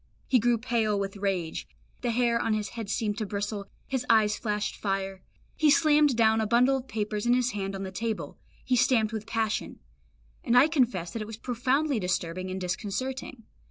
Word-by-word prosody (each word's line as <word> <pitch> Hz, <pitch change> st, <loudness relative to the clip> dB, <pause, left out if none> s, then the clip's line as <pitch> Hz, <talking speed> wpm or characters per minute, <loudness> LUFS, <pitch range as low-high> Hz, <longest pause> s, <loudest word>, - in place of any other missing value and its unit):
He 255 Hz, -, +4 dB
grew 240 Hz, +1 st, +3 dB
pale 225 Hz, -3 st, 0 dB
with 195 Hz, 0 st, -3 dB
rage; 190 Hz, -5 st, -2 dB, 0.3 s
the 245 Hz, -, -1 dB
hair 235 Hz, 0 st, +2 dB
on 225 Hz, -1 st, +1 dB
his 210 Hz, -1 st, -2 dB
head 225 Hz, -3 st, -6 dB
seemed 215 Hz, -1 st, -1 dB
to 215 Hz, -, -1 dB
bristle, 200 Hz, 0 st, -3 dB, 0.2 s
his 265 Hz, -2 st, -2 dB
eyes 215 Hz, -2 st, +4 dB
flashed 210 Hz, -2 st, -2 dB
fire; 195 Hz, -1 st, -3 dB, 0.3 s
he 310 Hz, -, +3 dB
slammed 295 Hz, -2 st, +5 dB
down 220 Hz, -1 st, +4 dB
a 220 Hz, -, 0 dB
bundle 250 Hz, +4 st, +4 dB
of 260 Hz, 0 st, -8 dB
papers 210 Hz, 0 st, -2 dB
in 240 Hz, -, +5 dB
his 250 Hz, 0 st, +1 dB
hand 195 Hz, -2 st, -3 dB
on 195 Hz, -, -4 dB
the 190 Hz, -, -5 dB
table, 220 Hz, +2 st, -4 dB, 0.3 s
he 255 Hz, -, +2 dB
stamped 235 Hz, -3 st, +3 dB
with 215 Hz, -1 st, -5 dB
passion; 225 Hz, -1 st, -2 dB, 0.7 s
and 235 Hz, -, +3 dB
I 265 Hz, +4 st, +7 dB
confess 235 Hz, -, +1 dB
that 230 Hz, -, -4 dB
it -, -, -3 dB
was 220 Hz, -1 st, -7 dB
profoundly 255 Hz, +3 st, 0 dB
disturbing 185 Hz, -1 st, -2 dB
and 185 Hz, +1 st, -4 dB
disconcerting. 225 Hz, +7 st, -4 dB
220 Hz, 195 wpm, -28 LUFS, 200-245 Hz, 0.7 s, I